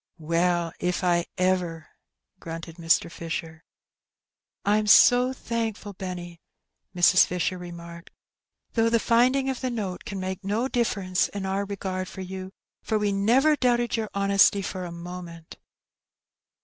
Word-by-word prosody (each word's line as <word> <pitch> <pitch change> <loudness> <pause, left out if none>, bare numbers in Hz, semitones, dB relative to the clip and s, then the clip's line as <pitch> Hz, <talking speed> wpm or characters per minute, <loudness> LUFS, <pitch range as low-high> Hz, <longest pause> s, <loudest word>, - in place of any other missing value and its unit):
" - - -57
Well, 170 +1 0
if 180 +1 -1
I 175 -1 +2
ever 185 -2 +1
1 160 -1 -14 0.3
" 190 - -53
grunted 165 0 -8
Mr. 165 0 +2
Fisher. 165 -1 -6 1.0
'Tm 210 +1 +2
so 245 +4 +7
thankful, 225 -5 -4
Benny,'' 175 -3 -7 0.5
Mrs. 180 +1 +6
Fisher 180 +1 -2
remarked; 170 -1 -10 0.6
''though 230 -1 +3
the 230 0 +3
finding 250 +4 +3
of 265 -2 -2
the 255 - -1
note 205 -7 -4
can 200 -1 -6
make 185 +1 -4
no 215 +6 0
difference 200 -8 0
in 200 -1 -5
our 195 +1 -1
regard 190 -2 -4
for 190 - -8
you, 190 0 -7 0.3
for 220 - -1
we 210 -1 0
never 240 +10 +3
doubted 240 -3 +1
your 220 -2 -2
honesty 200 0 +4
for 185 -1 -4
a 175 - -7
moment." 170 -1 -9
185 Hz, 150 wpm, -26 LUFS, 175-215 Hz, 1.0 s, so